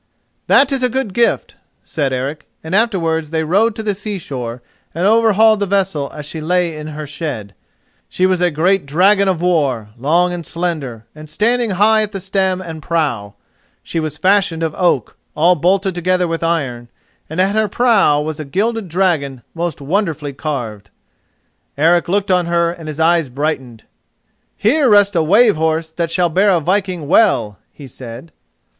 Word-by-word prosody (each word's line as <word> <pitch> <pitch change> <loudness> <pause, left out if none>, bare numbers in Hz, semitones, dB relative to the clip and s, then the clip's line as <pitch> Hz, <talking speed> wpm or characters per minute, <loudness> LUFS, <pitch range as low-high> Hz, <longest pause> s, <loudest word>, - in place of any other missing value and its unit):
"That 275 +1 +4
is 270 -1 -1
a 250 - +2
good 245 -5 -3
gift," 235 +3 0 0.3
said 140 -4 -2
Eric; 135 +4 -4 0.2
and 160 +2 -6
afterwards 170 -8 +1
they 160 0 -1
rode 205 +7 +2
to 220 - -5
the 210 -1 0
seashore 140 - -6 0.3
and 170 +3 -1
overhauled 220 0 +4
the 200 - -1
vessel 190 -7 0
as 150 - -8
she 155 +2 -6
lay 175 0 0
in 150 0 -7
her 155 0 -6
shed. 140 - -6 0.6
She 185 - 0
was 185 -1 +1
a 180 - +3
great 175 +2 +1
dragon 195 +7 +3
of 180 -3 0
war, 140 -11 0
long 170 +7 +2
and 175 -1 -5
slender, 155 -11 -4
and 155 0 -12
standing 235 +7 +1
high 215 +2 +4
at 210 -2 -3
stem 190 -1 -1
and 165 -3 -8
prow. 140 - -2 0.5
She 165 - -3
was 155 -2 -4
fashioned 185 -1 +1
of 160 -2 -1
oak, 170 - 0 0.2
all 170 +4 +4
bolted 190 +4 +1
together 180 +1 0
with 165 0 -3
iron, 135 -8 -2 0.4
and 160 +3 -5
at 190 +2 +2
her 220 0 +1
prow 205 -9 +3
was 155 +1 -5
a - - -4
gilded 205 +7 -2
dragon 155 -8 0
most 170 -3 -4
wonderfully 155 -3 -2
carved. 120 -9 -5 0.9
Eric 170 +4 +3
looked 200 +1 0
on 180 -2 +2
her 170 0 +1
and 165 -2 -10
his 155 0 -6
eyes 165 -3 +2
brightened. 130 -4 -4 0.7
"Here 265 +5 +2
rests 205 -2 +4
a 165 - +3
wave 205 +5 +4
horse 160 0 -1
that 165 0 -2
shall 175 +1 +1
bear 190 +5 +2
a 180 -3 +3
viking 185 -1 -1
well," 165 - +2
he 145 - -12
said. 125 +4 -10
170 Hz, 175 wpm, -17 LUFS, 150-195 Hz, 0.9 s, That